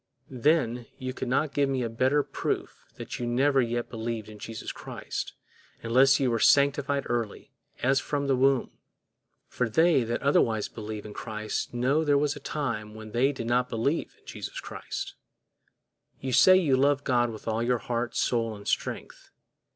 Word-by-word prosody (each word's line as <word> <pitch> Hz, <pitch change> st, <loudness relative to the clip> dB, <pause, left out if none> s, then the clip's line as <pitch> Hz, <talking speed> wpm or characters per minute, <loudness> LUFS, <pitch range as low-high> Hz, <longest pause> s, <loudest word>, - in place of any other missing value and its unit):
Then, 125 Hz, -3 st, +1 dB
you 130 Hz, 0 st, -4 dB
could 130 Hz, -, -5 dB
not 140 Hz, +4 st, +1 dB
give 140 Hz, -1 st, +2 dB
me 130 Hz, -2 st, 0 dB
a -, -, -1 dB
better 130 Hz, +6 st, +2 dB
proof -, -, -4 dB
that -, -, -7 dB
you 120 Hz, -, -2 dB
never 135 Hz, +3 st, +3 dB
yet 120 Hz, 0 st, -2 dB
believed 115 Hz, -1 st, -4 dB
in 105 Hz, -1 st, -11 dB
Jesus 115 Hz, +1 st, -6 dB
Christ, -, -, -6 dB, 0.5 s
unless 130 Hz, +4 st, +5 dB
you 130 Hz, -3 st, +2 dB
were 115 Hz, -, 0 dB
sanctified 140 Hz, +1 st, +3 dB
early, 115 Hz, -3 st, -3 dB, 0.3 s
as 135 Hz, +2 st, +4 dB
from 140 Hz, +1 st, -2 dB
the 135 Hz, -1 st, +2 dB
womb; 135 Hz, 0 st, +2 dB, 0.8 s
for 125 Hz, -2 st, -1 dB
they 160 Hz, +1 st, +4 dB
that 115 Hz, +1 st, -3 dB
otherwise 115 Hz, -6 st, +2 dB
believe 110 Hz, -1 st, -7 dB
in 105 Hz, -, -8 dB
Christ 110 Hz, -1 st, -4 dB
know 130 Hz, +6 st, +1 dB
there 145 Hz, -2 st, +3 dB
was 145 Hz, +1 st, +1 dB
a -, -, -8 dB
time 115 Hz, -8 st, -4 dB
when 110 Hz, 0 st, -9 dB
they 130 Hz, +5 st, +2 dB
did 130 Hz, -5 st, -6 dB
not 125 Hz, +1 st, +1 dB
believe 125 Hz, +8 st, -1 dB
in -, -, -32 dB
Jesus -, -, -6 dB
Christ.You 130 Hz, -1 st, -9 dB
say 185 Hz, +9 st, +7 dB
you 155 Hz, -8 st, +3 dB
love 140 Hz, +1 st, +2 dB
God 120 Hz, -3 st, +2 dB
with 110 Hz, -1 st, -9 dB
all 110 Hz, 0 st, 0 dB
your 120 Hz, +1 st, +2 dB
heart, 120 Hz, +2 st, -3 dB
soul, 115 Hz, -2 st, 0 dB
and 100 Hz, 0 st, -11 dB
strength. -, -, -3 dB
125 Hz, 175 wpm, -27 LUFS, 115-140 Hz, 0.8 s, say